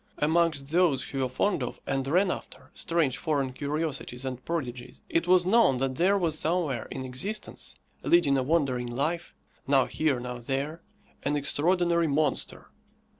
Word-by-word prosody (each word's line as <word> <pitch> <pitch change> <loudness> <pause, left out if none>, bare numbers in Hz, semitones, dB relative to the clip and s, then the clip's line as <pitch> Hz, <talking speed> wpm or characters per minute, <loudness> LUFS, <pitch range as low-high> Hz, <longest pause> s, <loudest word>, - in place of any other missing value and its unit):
Amongst 155 -2 +1
those 170 -5 +3
who 135 - -5
were 130 -1 0
fond 185 +6 0
of, 125 - -4
and 135 -1 -1
ran 180 +6 +3
after, - - -8
strange 165 -7 0
foreign 140 -5 -1
curiosities 145 -3 -3
and 130 -1 -5
prodigies, 125 -6 -4
it 165 +1 +1
was 180 -1 +5
known 195 - +4
that 130 +1 0
there 195 +3 +4
was 165 -5 0
somewhere 155 -8 0
in 130 - -5
existence, 190 +13 -4 0.3
leading 170 -5 +4
a 135 - +2
wandering 130 -4 +1
life, 150 +8 -2 0.3
now 135 -1 +4
here, 150 -5 0
now 125 0 -5
there, 140 +6 -3 0.4
an 145 +1 0
extraordinary 170 +4 +2
monster. 145 -1 -1
145 Hz, 155 wpm, -28 LUFS, 130-170 Hz, 0.4 s, was